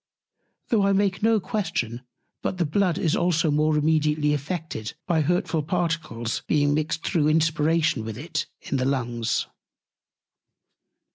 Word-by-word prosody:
Though 225 Hz, -4 st, +3 dB
I 200 Hz, -, +3 dB
make 195 Hz, -2 st, +1 dB
no 225 Hz, 0 st, +4 dB
Question 175 Hz, -, -2 dB, 0.4 s
but 185 Hz, -, -2 dB
the 175 Hz, -, +1 dB
Blood 180 Hz, +2 st, +1 dB
is 170 Hz, -5 st, +1 dB
also 165 Hz, -3 st, +2 dB
more 155 Hz, +1 st, +2 dB
immediately 150 Hz, -1 st, +2 dB
affected 150 Hz, -, -4 dB
by 170 Hz, -3 st, +2 dB
hurtful 165 Hz, 0 st, 0 dB
Particles 160 Hz, -8 st, -2 dB
being 145 Hz, -1 st, +3 dB
mixed 155 Hz, +2 st, -1 dB
through 150 Hz, -3 st, +2 dB
Inspiration 160 Hz, -2 st, +2 dB
with 110 Hz, -1 st, -6 dB
it 155 Hz, +3 st, -3 dB
in 140 Hz, -, -2 dB
the 130 Hz, -, 0 dB
Lungs. 120 Hz, -4 st, -1 dB
155 Hz, 135 wpm, -25 LUFS, 145-175 Hz, 0.4 s, no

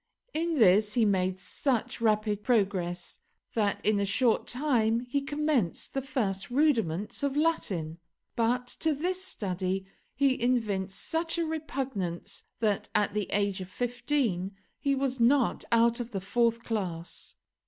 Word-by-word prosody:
In 330 Hz, +1 st, 0 dB
this 210 Hz, -1 st, +5 dB
he 235 Hz, -3 st, +4 dB
made 185 Hz, -2 st, +1 dB
such 245 Hz, +2 st, -1 dB
rapid 215 Hz, -2 st, +1 dB
progress 190 Hz, -7 st, 0 dB, 0.3 s
that 205 Hz, -3 st, 0 dB
in 215 Hz, -1 st, +4 dB
a -, -, +1 dB
short 230 Hz, +4 st, +2 dB
time 235 Hz, -4 st, +1 dB
he 255 Hz, +3 st, -1 dB
commenced 290 Hz, -, 0 dB
the 270 Hz, -, 0 dB
first 220 Hz, -8 st, -2 dB
rudiments 235 Hz, -, +1 dB
of 280 Hz, 0 st, 0 dB
Latin. 185 Hz, -, 0 dB, 0.4 s
But 240 Hz, +2 st, +1 dB
to 315 Hz, -2 st, +2 dB
this 365 Hz, +5 st, -1 dB
study 190 Hz, -, -2 dB, 0.3 s
he 265 Hz, -1 st, +2 dB
evinced 205 Hz, -6 st, 0 dB
such 330 Hz, +1 st, -1 dB
a 335 Hz, -, +1 dB
repugnance 265 Hz, -, -4 dB, 0.2 s
that 210 Hz, -3 st, 0 dB
at 210 Hz, -1 st, +2 dB
the 210 Hz, -2 st, -2 dB
age 200 Hz, -2 st, 0 dB
of 185 Hz, -, -7 dB
fifteen 235 Hz, -5 st, -1 dB, 0.2 s
he 280 Hz, -1 st, +1 dB
was 265 Hz, -1 st, -1 dB
not 245 Hz, +1 st, +3 dB
out 235 Hz, +1 st, +4 dB
of 240 Hz, -1 st, -4 dB
the 200 Hz, -, -3 dB
fourth 230 Hz, +4 st, +1 dB
class. 175 Hz, -7 st, -4 dB
230 Hz, 145 wpm, -29 LUFS, 195-270 Hz, 0.4 s, this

